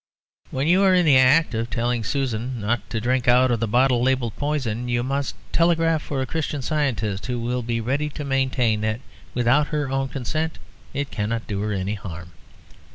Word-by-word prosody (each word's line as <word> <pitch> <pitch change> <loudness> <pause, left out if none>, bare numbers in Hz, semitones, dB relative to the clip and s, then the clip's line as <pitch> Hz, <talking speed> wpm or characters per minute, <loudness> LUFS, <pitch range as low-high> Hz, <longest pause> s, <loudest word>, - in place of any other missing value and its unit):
When 135 +2 -2
you 180 +3 +4
are 190 -2 +5
in 180 -1 +4
the 140 -4 +6
act 140 +5 +4
of 115 +1 -2
telling 120 0 -1
Susan 125 0 -2
not 110 0 -2
to 115 - -2
drink 125 +2 0
out 125 +1 +5
of 120 - +1
the 115 - 0
bottle 125 +2 +3
labelled 125 -3 +1
"poison," 130 -6 -2
you 120 0 0
must 140 +2 -2 0.2
telegraph 165 -1 +2
for 135 -3 -3
a - - -2
Christian 145 -1 -3
Scientist, 120 -10 -1
who 125 -1 -2
will 125 +2 -1
be 115 0 -2
ready 140 +6 -1
to 150 - -6
maintain 130 -5 +1
that 110 +2 -1 0.3
without 125 +5 +3
her 145 -3 -2
own 135 0 -1
consent 155 +5 -3 0.3
it 140 0 -3
cannot 115 +2 -2
do 100 -2 -3
her 105 0 -2
any 100 0 -2
harm. 90 -4 -8
125 Hz, 195 wpm, -23 LUFS, 115-140 Hz, 0.3 s, the